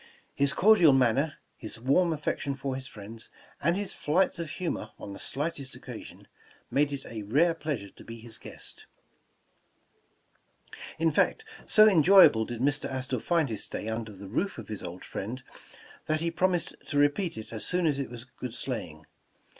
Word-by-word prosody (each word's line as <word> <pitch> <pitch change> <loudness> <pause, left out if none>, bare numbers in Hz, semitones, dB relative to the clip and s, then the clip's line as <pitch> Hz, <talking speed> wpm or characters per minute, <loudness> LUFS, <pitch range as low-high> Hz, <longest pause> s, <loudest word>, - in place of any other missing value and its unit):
His 140 0 +2
cordial 185 -7 +6
manner, 135 +4 +2 0.2
his 110 -2 -7
warm 140 +8 +3
affection 145 -2 -2
for 135 -1 -3
his 130 0 -6
friends, 110 +2 -10 0.3
and 170 +4 +2
his 205 -1 -3
flights 175 +4 +1
of 165 -2 -3
humor 175 +3 -3
on 100 - -8
the - - -9
slightest 145 -2 -3
occa - - -8
sion, - - -14 0.4
made 145 +1 +2
it 140 -1 -5
a 115 -2 -6
rare 150 +12 +3
pleasure 145 - -4
to - - -15
be 115 0 -9
his 115 0 -8
guest. - - -10 2.1
In 165 0 +2
fact, 440 - +2 0.2
so 215 0 +7
enjoyable 180 - +7
did 120 0 -6
Mr. 145 +2 +1
Astor 130 -1 -2
find 165 +1 +1
his 110 -3 -3
stay 110 - -4
under 110 -1 -3
the 100 0 -10
roof 185 - -1
of 115 -3 -9
his 105 - -5
old 90 +1 -7
friend, 120 +6 -5 0.6
that 155 0 +1
he 170 +1 -1
promised 180 0 +1
to 145 - -2
repeat 145 - +2
it 110 +1 -8
as 110 - -5
soon 180 -1 0
as 145 -3 +2
it 140 - -3
was 120 -1 -8
good 125 -1 -8
sleighing. 95 - -5
140 Hz, 180 wpm, -29 LUFS, 115-165 Hz, 2.1 s, so